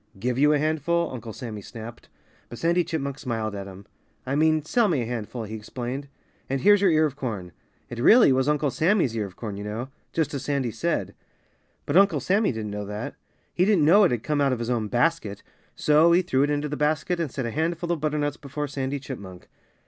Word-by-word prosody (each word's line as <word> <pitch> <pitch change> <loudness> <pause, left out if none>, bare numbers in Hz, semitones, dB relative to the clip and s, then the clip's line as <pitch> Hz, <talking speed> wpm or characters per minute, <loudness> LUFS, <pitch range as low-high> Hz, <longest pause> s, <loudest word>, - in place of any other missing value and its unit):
"Give 125 +5 -1
you 150 +1 +5
a 150 - +4
handful 160 +3 0
" - - -8
Uncle 115 -2 -7
Sammy 110 -3 -7
snapped. 115 +3 -10 0.4
But 120 - -8
Sandy 170 +4 +2
Chipmunk 140 -4 -4
smiled 110 -5 -3
at 100 -1 -6
him. 95 +1 -11 0.4
"I 130 - -2
mean, 155 +1 +3
sell 230 +8 +2
me 150 -10 +1
a - - -4
handful," 115 0 -4
he 110 0 -7
explained. 125 +5 -5 0.4
"And 135 0 -1
here's 205 +5 +5
your 195 - +5
ear 155 -1 +4
of 145 -3 -3
corn." 110 -10 -5 0.4
It 120 - -7
really 215 - +6
was 130 +2 +1
Uncle 150 -2 +1
Sammy's 165 - +2
ear 105 -3 -1
of 95 - -15
corn, 105 -3 -6
you 100 - -6
know 110 +5 -5 0.2
just 160 -3 -1
as 140 - -4
Sandy 140 -5 -1
said. 115 - -2 0.7
But - - +2
Uncle 200 +1 +5
Sammy 200 +3 +2
didn't 110 -3 -5
know 105 0 -5
that. 105 +1 -5 0.4
He 180 - +2
didn't 190 -6 +4
know 200 +7 +7
it 185 - +5
had 120 -2 -2
come 150 -1 0
out 140 -1 +3
of 130 - 0
his 120 +1 -3
own 115 -3 0
basket. 120 -4 0 0.3
So 155 +3 +4
he 180 +2 +4
threw 135 -6 +1
it 145 - +2
into 145 0 0
the 150 - -4
basket 150 +3 0
and 165 -3 -1
set 130 - -3
a 115 - -3
handful 170 +4 -1
of 165 -4 -1
butternuts 150 -1 -1
before 145 +1 -5
Sandy 135 0 -3
Chipmunk. 100 -8 -9
140 Hz, 225 wpm, -25 LUFS, 115-160 Hz, 0.7 s, know